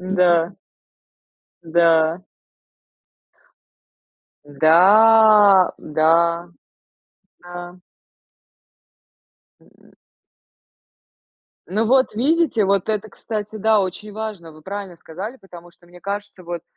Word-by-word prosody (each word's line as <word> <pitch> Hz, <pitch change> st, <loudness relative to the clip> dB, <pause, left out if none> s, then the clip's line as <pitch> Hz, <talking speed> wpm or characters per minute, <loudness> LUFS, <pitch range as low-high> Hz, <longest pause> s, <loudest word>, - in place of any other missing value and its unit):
Н-да. 180 Hz, -2 st, +1 dB, 1.1 s
Да. 165 Hz, 0 st, +1 dB, 2.2 s
Да. 200 Hz, +6 st, +4 dB
Да. 170 Hz, +2 st, 0 dB, 1.0 s
Да. 175 Hz, 0 st, -11 dB, 1.8 s
М. -, -, -25 dB, 1.7 s
Ну 215 Hz, +5 st, -2 dB
вот 260 Hz, +1 st, +2 dB
видите, 280 Hz, -1 st, 0 dB
вот 195 Hz, 0 st, 0 dB
это, 215 Hz, 0 st, -3 dB
кстати, 215 Hz, 0 st, -7 dB
да, 215 Hz, 0 st, +2 dB
очень 200 Hz, +2 st, -6 dB
важно. 210 Hz, -7 st, -8 dB
Вы 155 Hz, 0 st, -18 dB
правильно 195 Hz, -1 st, -8 dB
сказали, 190 Hz, +10 st, -9 dB
потому 175 Hz, -6 st, -15 dB
что, 175 Hz, -, -26 dB
мне 175 Hz, +1 st, -17 dB
кажется, 200 Hz, -1 st, -7 dB
вот, 170 Hz, -1 st, -7 dB
185 Hz, 80 wpm, -19 LUFS, 170-215 Hz, 2.2 s, Да